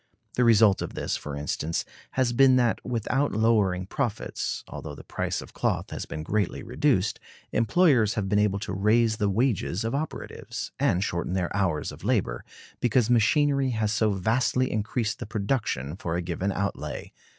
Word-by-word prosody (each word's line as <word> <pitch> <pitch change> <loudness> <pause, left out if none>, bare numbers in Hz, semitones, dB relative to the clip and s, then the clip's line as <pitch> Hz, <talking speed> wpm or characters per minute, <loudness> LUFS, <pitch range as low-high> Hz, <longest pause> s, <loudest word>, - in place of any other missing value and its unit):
The 125 - +2
result 110 -4 +5
of - - -5
this, - - -2
for 75 -1 -5
instance, 75 +2 -2 0.3
has 130 -2 +1
been 130 +1 +6
that, 120 -3 +2
without 125 +4 0
lowering 105 -5 +2
profits, 110 +1 -3
although - - -7
the - - -11
price - - -3
of - - -15
cloth - - -1
has - - -5
been 80 -1 -5
greatly 100 +3 -1
reduced, 115 -9 +1 0.3
employers 115 - +3
have 105 -4 -1
been 105 +1 +2
able 105 -1 +2
to 105 -2 -4
raise 110 +3 +3
the 105 -2 +1
wages 110 -2 0
of 115 - -2
operatives, 150 +3 -5
and 90 +2 +2
shorten 85 -2 -2
their 90 -1 -1
hours 95 -6 0
of - - -12
labor, - - 0 0.4
because 120 0 +2
machinery 140 +4 +3
has 110 -3 0
so 110 -2 +2
vastly 125 +6 +1
increased 110 +1 -1
the - - -6
production 100 - -1
for 85 -3 -3
a 90 - 0
given 90 +3 -2
outlay. 90 -8 -3
110 Hz, 170 wpm, -26 LUFS, 95-120 Hz, 0.4 s, been